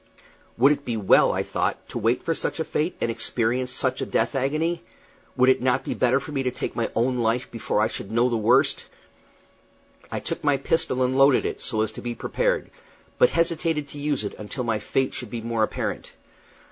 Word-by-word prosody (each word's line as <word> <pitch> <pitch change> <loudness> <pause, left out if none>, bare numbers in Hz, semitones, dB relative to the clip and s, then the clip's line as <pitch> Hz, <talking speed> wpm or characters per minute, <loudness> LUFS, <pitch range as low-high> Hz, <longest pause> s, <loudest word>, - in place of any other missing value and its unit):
Would 135 +5 +6
it 145 -1 -1
be 120 -4 -2
well, 100 -3 +5
I - - -1
thought, - - -2
to - - -4
wait 115 +3 +1
for 165 - 0
such - - -2
a - - +1
fate, 155 +2 -1
and 115 - 0
experience 120 +2 -1
such 130 0 -1
a - - -1
death - - 0
agony? 155 +6 0 0.6
Would 130 0 +5
it 130 - +3
not 125 0 +1
be - - -3
better 130 +2 +2
for 140 - -9
me 140 -2 -1
to 130 - 0
take 125 - -4
my 115 - -1
own 125 +2 +1
life 120 +2 0
before 115 -2 -1
I 110 - +3
should 100 - -6
know 120 +2 +3
the 120 - 0
worst? 125 +6 +2 1.2
I - - -2
took - - -4
my 145 -2 +3
pistol 140 -2 0
and 125 +1 +1
loaded 135 0 +5
it, - - -3
so 110 -3 -1
as 110 -1 0
to - - -9
be 120 -1 -4
prepared, - - -1 0.5
but - - +6
hesitated 165 -3 0
to 145 - -9
use 145 -4 -1
it 100 - -4
until 110 +5 -5
my 115 -2 0
fate 130 +5 -1
should 125 - -6
be 115 0 -5
more 115 0 -2
apparent. 110 - -2
130 Hz, 215 wpm, -24 LUFS, 115-145 Hz, 1.2 s, Would